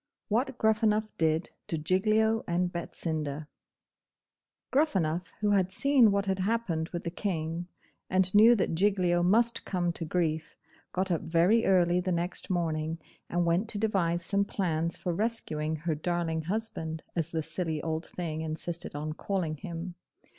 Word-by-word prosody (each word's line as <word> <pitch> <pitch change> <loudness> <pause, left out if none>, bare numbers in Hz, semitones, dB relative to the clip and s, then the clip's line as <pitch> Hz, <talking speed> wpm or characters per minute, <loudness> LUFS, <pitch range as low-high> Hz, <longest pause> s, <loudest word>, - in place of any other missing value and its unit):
WHAT 255 +5 0
GRUFFANUFF 215 -1 +2
DID 160 +1 +1 0.2
TO 165 - -1
GIGLIO 215 +7 +2
AND 175 +1 0
BETSINDA 155 -3 -3 1.3
Gruffanuff, 185 - +1
who 210 -1 +2
had 190 -2 +3
seen 270 +1 +5
what 200 0 +1
had 190 -1 -1
happened 190 -5 0
with 175 - -5
the 170 - -3
King, 170 -2 -3 0.4
and 185 0 +2
knew 220 +3 +8
that 190 - 0
Giglio 180 -1 +2
must 230 +6 +3
come 175 -2 -1
to 165 - -5
grief, 160 -1 -1 0.3
got 185 0 -1
up 170 - +1
very 175 +8 +3
early 180 -2 +4
the 185 +1 -1
next 175 +1 -2
morning, 165 -3 -1 0.3
and 175 0 +1
went 175 +6 +1
to 210 - -3
devise 180 -5 0
some 200 +1 +2
plans 170 -5 -1
for 175 - -2
rescuing 165 -7 -1
her 160 +1 -2
darling 165 +1 -1
husband, 175 -6 -3
as 165 -3 -1
the 160 -1 -2
silly 160 -2 -3
old 160 0 -2
thing 160 -3 -4
insisted 160 +1 -4
on 155 +1 -3
calling 170 -3 -2
him. 175 +1 -6
175 Hz, 155 wpm, -29 LUFS, 160-200 Hz, 1.3 s, knew